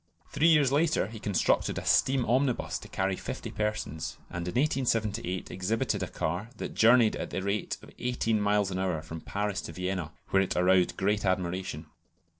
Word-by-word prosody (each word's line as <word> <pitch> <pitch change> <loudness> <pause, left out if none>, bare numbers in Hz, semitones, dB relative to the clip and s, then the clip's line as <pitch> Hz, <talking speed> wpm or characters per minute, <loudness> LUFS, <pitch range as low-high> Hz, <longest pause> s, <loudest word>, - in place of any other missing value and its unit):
Three 150 +3 +3
years 150 -5 +5
later 155 - +2
he 110 -1 -8
constructed 100 -4 +1
a - - -4
steam 130 -2 +3
omnibus 130 +1 +1
to - - -11
carry 95 0 -1
fifty - - -6
persons, 105 -8 -3
and 85 0 -4
in 90 - -4
1878 115 - 0
exhibited 110 +3 -1
a 95 - -1
car 90 +8 -3
that - - -5
journeyed 115 -1 +5
at - - -4
the 95 - -3
rate 100 +1 -1
of - - -13
eighteen 115 -3 0
miles 105 -1 +2
an 90 - -2
hour 90 -5 -1
from 80 0 -7
Paris 100 -1 -2
to 85 - -8
Vienna, 90 -2 -3 0.2
where 95 - +4
it 95 - -1
aroused 90 0 +3
great 105 +1 +1
admiration. 95 -3 -1
100 Hz, 180 wpm, -29 LUFS, 90-115 Hz, 0.2 s, years